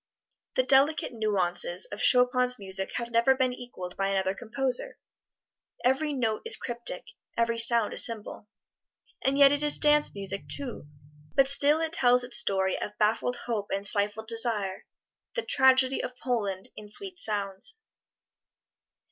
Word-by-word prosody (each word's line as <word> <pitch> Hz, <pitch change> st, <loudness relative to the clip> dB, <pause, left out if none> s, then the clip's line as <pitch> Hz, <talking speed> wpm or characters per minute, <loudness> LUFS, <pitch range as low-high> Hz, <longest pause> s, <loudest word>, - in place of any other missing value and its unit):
The 255 Hz, -, +2 dB
delicate 275 Hz, +2 st, +2 dB
nuances 185 Hz, -5 st, -1 dB
of 205 Hz, -, -7 dB
Chopin's 250 Hz, 0 st, +2 dB
music 190 Hz, -1 st, -3 dB
have 235 Hz, -1 st, -5 dB
never 235 Hz, +3 st, +3 dB
been 260 Hz, -1 st, 0 dB
equaled 215 Hz, -8 st, -9 dB
by 195 Hz, -, -1 dB
another 190 Hz, -1 st, -1 dB
composer; 265 Hz, -, -3 dB, 0.9 s
every 275 Hz, +4 st, +1 dB
note 230 Hz, -6 st, -2 dB
is 455 Hz, -, +4 dB
cryptic, 240 Hz, -1 st, -5 dB, 0.3 s
every 230 Hz, 0 st, 0 dB
sound 230 Hz, -1 st, +5 dB
a -, -, -5 dB
symbol. 220 Hz, -2 st, -3 dB, 0.7 s
And 270 Hz, +1 st, 0 dB
yet 280 Hz, -1 st, +6 dB
it 290 Hz, 0 st, 0 dB
is 295 Hz, 0 st, +1 dB
dance 295 Hz, -4 st, +2 dB
music, 195 Hz, 0 st, -3 dB
too, 250 Hz, -, -2 dB, 0.5 s
but 270 Hz, -1 st, +4 dB
still 285 Hz, +2 st, +4 dB
it 325 Hz, 0 st, -3 dB
tells 250 Hz, -5 st, +3 dB
its 245 Hz, 0 st, +4 dB
story 190 Hz, -1 st, -1 dB
of 210 Hz, -, -6 dB
baffled 220 Hz, +3 st, 0 dB
hope 215 Hz, -4 st, -3 dB
and 195 Hz, +1 st, -3 dB
stifled 205 Hz, +1 st, +3 dB
desire 225 Hz, -4 st, 0 dB, 0.5 s
the 475 Hz, -, -2 dB
tragedy 265 Hz, -1 st, +3 dB
of 250 Hz, -, -7 dB
Poland 205 Hz, -8 st, -3 dB
in 210 Hz, -1 st, -11 dB
sweet 370 Hz, -, -2 dB
sounds. 200 Hz, -, -2 dB
235 Hz, 145 wpm, -27 LUFS, 205-265 Hz, 0.9 s, yet